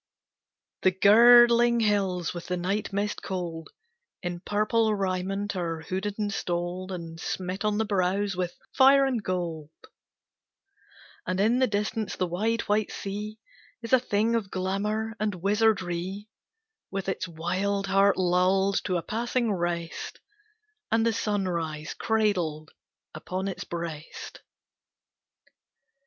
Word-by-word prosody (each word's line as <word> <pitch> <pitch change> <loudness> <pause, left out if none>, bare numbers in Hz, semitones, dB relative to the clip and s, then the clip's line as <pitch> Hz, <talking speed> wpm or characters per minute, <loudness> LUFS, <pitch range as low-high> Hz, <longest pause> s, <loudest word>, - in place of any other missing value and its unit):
The 185 - +5
girdling 235 +4 +6
hills 195 -5 +1
with 175 -1 -7
the 180 - -1
night 195 +4 -2
mist 205 +1 -2
cold 170 -4 -5 0.5
In 175 -1 -3
purple 215 +3 +1
raiment 195 +1 -2
are 165 -3 -3
hooded 190 +5 -3
and 205 -2 -1
stoled 175 +1 -3
And 165 -2 -7
smit 185 +3 -4
on 210 -1 +1
the 220 - +1
brows 195 0 0
with 180 -1 -2 0.2
fire 275 +1 +6
and 255 -4 0
gold; 170 -5 -3 1.6
And 185 +1 -1
in 225 +5 +3
the 260 - +4
distance 210 0 -2
the 185 - 0
wide, 215 +7 0
white 210 +1 0
sea 210 +2 -5 0.5
Is 230 - -4
a 260 - +8
thing 225 -1 +1
of 225 -4 -1
glamor 210 +4 -2
and 210 -2 -1
wizardry, 195 -1 0 0.6
With 195 -1 -4
its 190 -1 -2
wild 185 +4 -1
heart 195 +1 +3
lulled 185 +2 +2
to 185 - +1
a 170 - -3
passing 235 +1 -1
rest, 170 -2 -3 0.7
And 225 0 +3
the 230 - +2
sunrise 170 -8 -2
cradled 180 -9 0 0.4
upon 185 +5 -4
its 195 - -5
breast. 165 -3 -7
195 Hz, 125 wpm, -27 LUFS, 180-215 Hz, 1.6 s, a